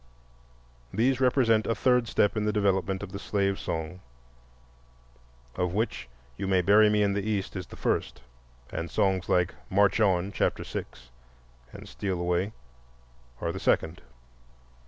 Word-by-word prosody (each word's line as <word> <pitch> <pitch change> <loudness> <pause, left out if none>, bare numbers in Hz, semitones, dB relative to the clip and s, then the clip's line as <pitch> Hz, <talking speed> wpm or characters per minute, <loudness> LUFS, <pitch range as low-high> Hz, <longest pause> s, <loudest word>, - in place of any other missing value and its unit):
These 130 +3 +1
represent 120 -4 +3
a 115 - +1
third 125 +1 +2
step 105 0 +2
in 105 - 0
the 105 - +2
development 95 -2 0
of 100 - -7
the 100 - -6
slave 100 -1 -1
song, 80 +2 -4 1.5
of 90 0 -1
which 105 - -2 0.3
"You 95 - -3
may 95 -1 +2
bury 105 +3 +6
me 105 0 +2
in 100 -1 +1
the 100 - -1
East" 105 -2 -2
is 90 -1 -5
the - - -11
first, - - -2 0.5
and 85 - -4
songs 95 0 0
like 90 -1 +2 0.2
"March 100 +2 +3
on" 95 -2 +2
(chapter - - -1
six) 60 -1 -8 0.6
and - - -11
"Steal 95 -3 -3
away" 90 +3 0 0.9
are - - -1
the - - -6
second. 80 -1 0
100 Hz, 150 wpm, -27 LUFS, 90-105 Hz, 1.5 s, bury